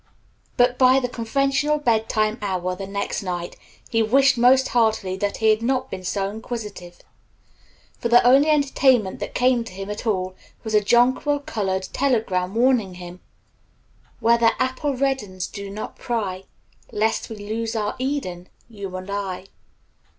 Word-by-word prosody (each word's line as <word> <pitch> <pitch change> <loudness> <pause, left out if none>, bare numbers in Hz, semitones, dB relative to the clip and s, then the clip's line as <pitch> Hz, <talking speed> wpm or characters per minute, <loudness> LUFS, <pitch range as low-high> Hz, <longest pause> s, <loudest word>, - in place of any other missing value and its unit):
But 245 0 +3
by 260 +1 +6
the 250 - -2
conventional 275 +5 0
bed 225 -6 +1
time 215 +1 0
hour 185 -3 -2
the 195 +1 -7
next 200 +2 -3
night 175 -2 -4 0.3
he 225 -1 +1
wished 270 +5 +4
most 255 +2 +4
heartily 220 -5 +1
that 205 +1 -2
he 220 -1 +4
had 215 +1 +1
not 260 +2 -1
been 185 -1 -6
so 195 +1 -1
inquisitive, 210 -5 -7 1.0
for 235 - -2
the 240 +1 +6
only 275 +5 +6
entertainment 265 -8 +2
that - - -6
came 250 -1 +3
to 230 - -10
him 195 +2 -6
at 210 +3 -6
all 185 -3 -1 0.3
was 220 -1 -5
a 210 - +5
jonquil 255 +6 +2
colored 190 -7 -2
telegram 215 -8 0
warning 235 -6 +2
him 180 0 -10 1.0
"Where 235 +1 +3
the 230 -1 +2
apple 260 +2 -1
reddens 245 -9 -1
do 200 -1 -8
not 210 +2 -7
pry, 195 -6 -3 0.5
Lest 220 +1 0
we 225 - -6
lose 220 +2 -4
our 210 -1 -1
Eden 250 -10 -3 0.2
you 200 -5 -8
and 185 0 -6
I." 195 -2 -4
220 Hz, 160 wpm, -22 LUFS, 195-255 Hz, 1.0 s, by